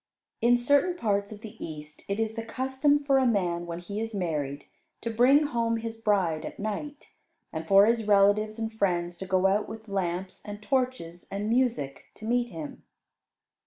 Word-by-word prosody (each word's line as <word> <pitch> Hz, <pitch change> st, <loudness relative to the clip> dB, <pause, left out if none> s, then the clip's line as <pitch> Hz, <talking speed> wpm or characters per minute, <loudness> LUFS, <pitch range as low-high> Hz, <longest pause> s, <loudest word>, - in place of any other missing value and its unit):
In 245 Hz, +1 st, +5 dB
certain 285 Hz, +8 st, +3 dB
parts 200 Hz, -6 st, 0 dB
of 210 Hz, -1 st, -9 dB
the 220 Hz, -2 st, -9 dB
East 155 Hz, -1 st, -8 dB
it 200 Hz, +2 st, -2 dB
is 220 Hz, -1 st, 0 dB
the 225 Hz, -, -4 dB
custom 265 Hz, +5 st, +1 dB
for 275 Hz, -1 st, +4 dB
a 260 Hz, -, +3 dB
man 175 Hz, -6 st, 0 dB
when 170 Hz, 0 st, -4 dB
he 200 Hz, +5 st, -5 dB
is 225 Hz, -1 st, -4 dB
married 150 Hz, -6 st, -2 dB, 0.4 s
to 230 Hz, -, -3 dB
bring 255 Hz, +6 st, +5 dB
home 235 Hz, -5 st, 0 dB
his 225 Hz, 0 st, -5 dB
bride 195 Hz, -8 st, +1 dB
at -, -, -7 dB
night, 215 Hz, +8 st, -5 dB, 0.4 s
and 160 Hz, 0 st, -5 dB
for 195 Hz, +1 st, +7 dB
his 225 Hz, -1 st, +1 dB
relatives 210 Hz, +2 st, +4 dB
and 225 Hz, 0 st, -3 dB
friends 175 Hz, -5 st, 0 dB
to 190 Hz, -, -6 dB
go 185 Hz, 0 st, +2 dB
out 200 Hz, +2 st, +2 dB
with 220 Hz, 0 st, -9 dB
lamps 185 Hz, -1 st, -3 dB
and 205 Hz, -1 st, -7 dB
torches 250 Hz, -9 st, -2 dB
and 200 Hz, +2 st, -3 dB
music 230 Hz, -, 0 dB
to 215 Hz, -, -10 dB
meet 240 Hz, +1 st, +1 dB
him. 160 Hz, -6 st, -8 dB
215 Hz, 185 wpm, -28 LUFS, 185-235 Hz, 0.4 s, for